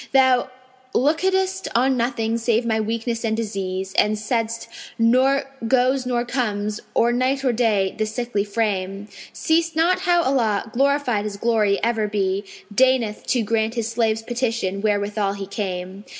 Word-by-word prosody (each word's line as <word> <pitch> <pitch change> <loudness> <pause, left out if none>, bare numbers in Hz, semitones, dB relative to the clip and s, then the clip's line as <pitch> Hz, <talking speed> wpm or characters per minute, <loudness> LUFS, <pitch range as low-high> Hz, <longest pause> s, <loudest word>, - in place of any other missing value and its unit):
Thou 260 -1 +4 0.5
lookedest 380 +7 +1
on 260 +3 +3
nothing 230 -2 -1
save 230 0 +1
my 220 -1 +1
weakness 230 +2 -2
and 220 -1 0
disease; 190 -3 -3
* - - -6
And 215 0 +2
saidst 230 +1 -2 0.3
'Nor 260 +5 +3 0.2
goes 255 +1 +2
nor 240 -1 0
comes, 215 -4 -2 0.2
or 235 +1 +3
night 265 +2 0
or 250 - +3
day, 215 -5 +1
this 215 -1 -2
sickly 240 -3 -1
frame. 205 -1 -2 0.2
Seest 325 0 0
not 345 +3 +3
how 350 -2 +2
Allah 225 -6 0
(glorified 270 -5 +1
His 205 -1 -4
glory 215 -3 +2
ever 225 -2 +1
be!) 200 -1 -1 0.2
* 205 - -17
Deigneth 250 -3 +2
to 245 -3 +1
grant 225 +1 0
His 230 -1 -2
slave's 225 -1 0
petition 230 -5 -2
wherewithal 205 -1 0
he 200 -1 -6
came. 190 -1 -5
230 Hz, 155 wpm, -22 LUFS, 210-255 Hz, 0.5 s, Thou